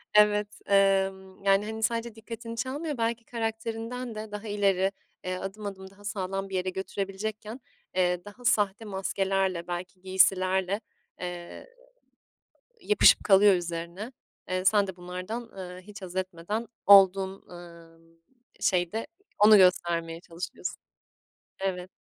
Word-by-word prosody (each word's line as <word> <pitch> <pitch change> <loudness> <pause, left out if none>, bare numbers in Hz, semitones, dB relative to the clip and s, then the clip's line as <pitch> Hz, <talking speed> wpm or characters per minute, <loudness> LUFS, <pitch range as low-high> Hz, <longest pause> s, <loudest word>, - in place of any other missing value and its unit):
Evet, 210 0 +5 0.2
emm, 195 -1 +2
yani, 195 +1 +4
hani, 220 0 -5
sadece 230 0 -1
dikkatini 230 +1 -8
çalmıyor, 285 +4 -3
belki 230 0 -1
karakterinden 225 +1 -4
de 215 0 -6
daha 210 +1 -6
ileri, 195 -2 +2 0.3
eee, 185 0 -2
adım 195 +3 -6
adım 190 -1 -6
daha 200 +1 -19
sağlam 195 -1 -3
bir 190 - -4
yere 185 0 0
götürebilecekken, 200 +4 -4 0.4
eee, 180 -1 +1
daha 240 +4 -12
sahte 205 0 +2
maskelerle, 190 -2 -1
belki 180 +1 -6
giysilerle, 190 +1 +2 0.4
eee, 175 -1 -7 1.1
yapışıp 210 -1 +5
kalıyor 200 0 +7
üzerine. 175 +6 -4 0.4
Eee, 185 0 -1
sen 200 0 +4
de 190 -1 -7
bunlardan, 185 +7 -6
eee, 180 -1 -8
hiç 210 +1 -12
haz 185 0 -8
etmeden 185 +4 -3 0.2
olduğun, 195 -1 +6
ımm, 165 -1 -14 0.4
şeyde 180 +5 +1 0.3
onu 210 +1 +8
göstermeye 170 -3 +3
çalışıyorsun. 175 +1 -6 0.8
Evet. 185 -1 -3
195 Hz, 125 wpm, -28 LUFS, 185-215 Hz, 1.1 s, onu